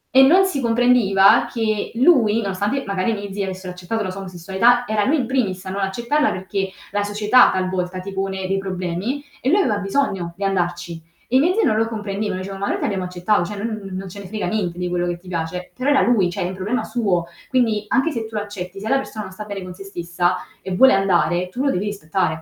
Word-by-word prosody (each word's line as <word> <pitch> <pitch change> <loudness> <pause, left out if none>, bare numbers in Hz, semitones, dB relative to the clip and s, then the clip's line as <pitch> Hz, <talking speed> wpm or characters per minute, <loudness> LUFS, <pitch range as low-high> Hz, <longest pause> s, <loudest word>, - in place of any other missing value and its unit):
e 265 - +9
non 365 +8 +6
si 295 -8 -1
comprendeva 230 -5 +4
che 215 -3 -1
lui 230 -5 +4
nonostante 205 +7 -1
magari 200 +3 0
i - - 0
miei 200 -2 -6
zii 200 0 -2
avessero 185 -1 -5
accettato 180 +5 -3
la 185 - -3
sua 195 +1 -7
omosessualità, 190 +7 +2
era 210 -1 +1
lui 305 +3 +3
in 255 - 0
primis 200 -9 -1
a - - -5
non 200 +1 -3
accettarla 235 +10 +1
perché 190 +1 -3 0.2
la 205 0 0
società 210 +4 +5
talvolta 185 0 -2
ti 195 +1 -7
pone 190 -1 -2
dei 195 +1 0
problemi, 190 +8 -3 0.2
e 260 - 0
lui 390 +6 +4
aveva 210 - +1
bisogno 195 -5 -1
di 200 - -5
andarci. 175 -3 -1 0.3
I 260 +2 +4
miei 350 +6 +3
zii 450 - +3
non 220 -4 +2
lo 225 0 +2
comprendevano, 205 -3 -3
dicevo: 195 0 -6
"Ma 200 - -1
noi - - 0
ti - - -2
abbiamo 190 -2 -1
accettato, 180 +2 +1
cioè 210 +4 -5
non 215 -2 -4
non 190 +1 -5
ce 200 +3 -9
ne 195 - -8
frega 215 0 -3
niente 180 -3 -2
di 180 0 -2
quello 175 0 -1
che 175 0 -2
ti 180 +1 -19
piace." 175 +1 -4
Però 260 +3 -1
era 285 - +5
lui, 210 -7 +3
cioè - - -4
è - - -1
un 185 - -5
problema 200 +7 -2
suo. 195 -8 0 0.2
Quindi 225 -5 +1
anche 270 +7 +2
se 225 -4 -4
tu 220 - -11
accetti, 205 -2 -5
se 215 - -6
la 270 - +3
persona 215 -5 -5
non 190 - -10
sta 210 +2 -7
bene 200 -2 -6
con 180 0 -8
sé 195 +2 -10
stessa 175 -1 -1 0.3
e 185 -1 -4
vuole 265 +6 +7
andare, 180 -2 +2
tu 255 +8 -3
lo 275 - +2
devi 190 +3 -1
rispettare. 175 -4 -1
195 Hz, 240 wpm, -21 LUFS, 185-225 Hz, 0.3 s, e